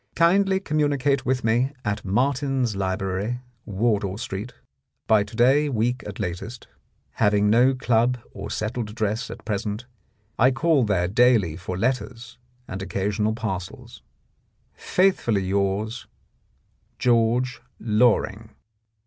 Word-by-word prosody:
Kindly 190 +3 +3
communicate 145 -5 0
with 130 -1 0
me 120 +5 +1
at 105 0 -2
Martin's 130 +2 0
Library, 95 +4 -2 0.3
Wardour 100 -2 0
Street, 115 -1 -5 0.5
by 110 -2 +4
to 105 +2 -12
day 135 +5 +4
week 120 0 0
at 100 - -8
latest. 100 +7 -5 0.5
Having 105 0 +3
no 125 +4 +4
club 125 0 +2 0.2
or 100 +1 -7
settled 110 +1 -3
address 110 +3 -2
at - - -10
present, 105 +2 -3 0.5
I 130 - +6
call 140 0 +2
there 90 -4 +1
daily 110 -5 +3
for 90 +1 -5
letters 120 +1 -3 0.3
and 95 +1 -6
occasional 105 +3 -1
parcels. 95 -6 -6 0.4
— - - -43
Faithfully 150 - +1
yours, 100 +4 -1 0.9
George 120 +1 +1 0.2
Loring. 110 -1 +1
115 Hz, 115 wpm, -24 LUFS, 100-125 Hz, 0.9 s, I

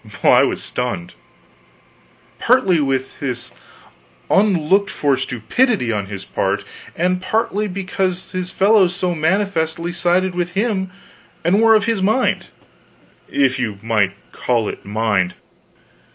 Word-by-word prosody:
Well, - - +6
I - - +7
was - - 0
stunned; 120 -9 -4 1.3
partly 230 -9 +3
with 135 -2 -2
this 125 -2 -3 0.8
unlooked 195 0 +3
for 145 -6 +1
stupidity 130 - 0
on 100 -3 -2
his 100 -1 -7
part, - - -1 0.3
and 180 +2 0
partly 210 +1 0
because 185 -1 -3
his 185 -1 -3
fellows 190 -1 +3
so 185 -2 -1
manifestly 170 -1 0
sided 180 +2 +1
with 175 0 -2
him 200 -3 0 0.5
and 185 +6 +3
were 225 -1 +6
of 215 -1 +2
his 225 -4 0
mind 220 +7 +1 0.8
if 135 -2 +1
you 110 -5 -2
might 105 -4 +1 0.2
call 115 -4 0
it - - -6
mind. 100 -3 0
175 Hz, 125 wpm, -19 LUFS, 125-195 Hz, 1.3 s, I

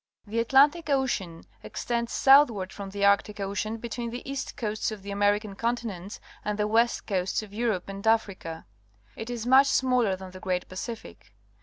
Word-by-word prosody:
The 220 +2 -2
Atlantic 285 +7 +4
Ocean 230 - -1 0.2
extends 235 -1 -3
southward 255 -9 +5
from 200 -1 -7
the 200 +1 -1
Arctic 200 +1 +2
Ocean 200 +3 -2
between 235 +1 -5
the 245 +3 -7
east 275 0 -5
coasts 215 -2 -2
of 215 -3 -8
the 200 - -6
American 205 +1 +1
continents 215 -4 -3 0.2
and 210 0 -2
the 210 0 +1
west 230 +2 +2
coasts 190 +1 -1
of 205 -2 -12
Europe 215 -5 -1
and 195 +2 -6
Africa. 195 -7 0 0.5
It 225 - -7
is 240 -2 -4
much 265 +3 +6
smaller 250 -7 +2
than 185 0 -10
the 185 - -10
great 185 -2 -2
Pacific. 225 +5 -8
215 Hz, 170 wpm, -27 LUFS, 195-240 Hz, 0.5 s, much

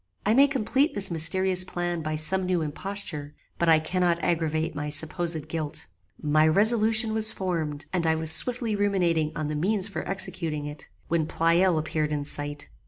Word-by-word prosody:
I 210 - +2
may 275 +4 +5
complete 270 +3 0
this 195 -2 0
mysterious 185 +3 +3
plan 175 -2 -4
by 155 0 -3
some 185 +5 +4
new 180 -3 0
imposture, 155 -2 -4 0.2
but 170 - +1
I 160 - +6
cannot 175 +2 0
aggravate 160 -1 -1
my 150 0 -5
supposed 160 +1 -3
guilt. 155 -2 -5 0.3
"My 155 +1 +2
resolution 220 +4 +4
was 220 0 +2
formed, 160 -6 -4
and 170 -3 0
I 160 - +2
was 160 0 +2
swiftly 235 +2 +1
ruminating 175 -6 0
on 155 -1 -3
the 150 - -4
means 190 +5 +1
for 200 - -5
executing 180 -6 -2
it, 150 0 -9 0.2
when 160 -2 -1
Pleyel 170 +2 +2
appeared 155 -1 -2
in 145 -1 -3
sight. 145 0 -3
170 Hz, 170 wpm, -25 LUFS, 155-195 Hz, 0.3 s, I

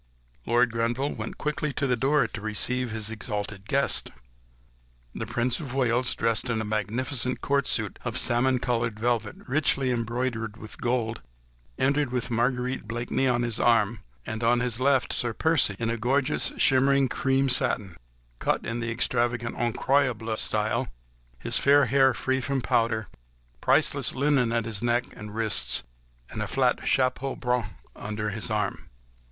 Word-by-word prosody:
Lord 120 0 +3
Grenville 115 +5 -1
went - - -6
quickly 150 0 -2
to 140 - -1
the 125 -2 +2
door 135 +1 +2
to 105 -1 -8
receive 120 +4 0
his 110 -1 -3
exalted 105 -2 -4
guest. 140 +1 +1 1.0
The 115 - -5
Prince 120 +2 0
of 135 -5 -6
Wales, 125 -1 +1
dressed 115 +2 0
in 115 -2 0
a - - -1
magnificent 115 +5 -1
court 140 -1 +1
suit - - 0
of - - -3
salmon 125 +2 +3
coloured 115 -3 -1
velvet 115 -2 0
richly 135 -1 +1
embroidered 115 -2 -2
with 110 -1 -9
gold, 120 -2 -1 0.6
entered 140 -1 +1
with 125 -1 -2
Marguerite 125 0 -1
Blakeney 120 +3 -1
on 120 -1 +1
his 120 -2 -2
arm; 115 -2 +3 0.3
and 110 +1 -4
on 120 +1 +3
his 125 -1 -1
left 135 0 +2
Sir 120 -2 0
Percy, 160 -11 +2
in 115 +1 -1
gorgeous 130 +4 +1
shimmering 135 +1 +4
cream 135 +2 +1
satin, 105 -7 +1 0.4
cut - - 0
in 115 +1 -3
the 120 0 -2
extravagant 120 0 -1
"Incroyable" 120 -1 0
style, 110 0 -1 0.5
his 60 - +1
fair 140 0 +5
hair 135 0 +4
free 130 +3 -1
from 140 +1 -1
powder, 110 -2 +1 0.5
priceless - - +2
lace 135 -4 +2
at 115 -1 0
his 115 -2 -4
neck 120 +1 +1
and 105 0 -9
wrists, 110 -2 +2 0.5
and 110 - -4
the 105 - -2
flat 125 +2 +1
chapeau 130 +1 +1
bras 125 -4 -1 0.3
under 105 0 -4
his 110 +4 -3
arm. 105 -1 -2
120 Hz, 155 wpm, -26 LUFS, 115-130 Hz, 1.0 s, fair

